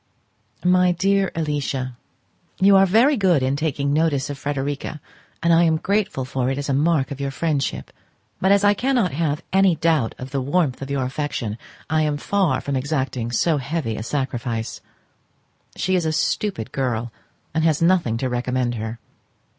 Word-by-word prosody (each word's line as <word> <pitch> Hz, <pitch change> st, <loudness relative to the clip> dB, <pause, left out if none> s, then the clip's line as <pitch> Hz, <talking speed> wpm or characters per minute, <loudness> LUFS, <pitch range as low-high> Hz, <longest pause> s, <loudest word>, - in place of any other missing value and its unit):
My 180 Hz, 0 st, +4 dB
dear 195 Hz, +1 st, +1 dB
Alicia,—You 145 Hz, +5 st, -1 dB
are 195 Hz, 0 st, +6 dB
very 235 Hz, +10 st, +4 dB
good 180 Hz, -, +3 dB
in 130 Hz, +1 st, +1 dB
taking 140 Hz, -2 st, -1 dB
notice 145 Hz, -2 st, +1 dB
of 145 Hz, -, -6 dB
Frederica, 145 Hz, +1 st, -3 dB, 0.4 s
and 170 Hz, 0 st, +4 dB
I 165 Hz, +1 st, +5 dB
am 160 Hz, -1 st, +3 dB
grateful 195 Hz, -7 st, -1 dB
for 130 Hz, -1 st, -1 dB
it 135 Hz, -, -1 dB
as 145 Hz, -, -3 dB
a -, -, +2 dB
mark 145 Hz, 0 st, +2 dB
of 140 Hz, 0 st, -5 dB
your 140 Hz, -, -1 dB
friendship; 145 Hz, 0 st, -2 dB, 0.5 s
but 190 Hz, -, +2 dB
as 200 Hz, 0 st, +4 dB
I 205 Hz, 0 st, +5 dB
cannot 245 Hz, -4 st, +1 dB
have 150 Hz, +1 st, -1 dB
any 190 Hz, -2 st, +4 dB
doubt 155 Hz, -7 st, +1 dB
of 130 Hz, 0 st, -8 dB
the 135 Hz, -1 st, -1 dB
warmth 140 Hz, -1 st, 0 dB
of 135 Hz, -, -5 dB
your 140 Hz, -1 st, -1 dB
affection, 130 Hz, -5 st, -3 dB, 0.3 s
I 155 Hz, 0 st, +1 dB
am 150 Hz, -1 st, 0 dB
far 170 Hz, -5 st, +1 dB
from 140 Hz, -, -3 dB
exacting 130 Hz, -3 st, -2 dB
so 150 Hz, +7 st, +1 dB
heavy 140 Hz, -4 st, -2 dB
a -, -, -5 dB
sacrifice. 120 Hz, -3 st, -3 dB, 0.9 s
She 185 Hz, -, -1 dB
is 175 Hz, -3 st, +1 dB
a -, -, +1 dB
stupid 155 Hz, -, -1 dB
girl, 120 Hz, -3 st, -2 dB, 0.4 s
and 160 Hz, -, +1 dB
has 160 Hz, -2 st, +3 dB
nothing 165 Hz, -10 st, +2 dB
to 130 Hz, -, -1 dB
recommend 125 Hz, 0 st, -1 dB
her. 110 Hz, 0 st, -5 dB
145 Hz, 170 wpm, -22 LUFS, 130-170 Hz, 0.9 s, are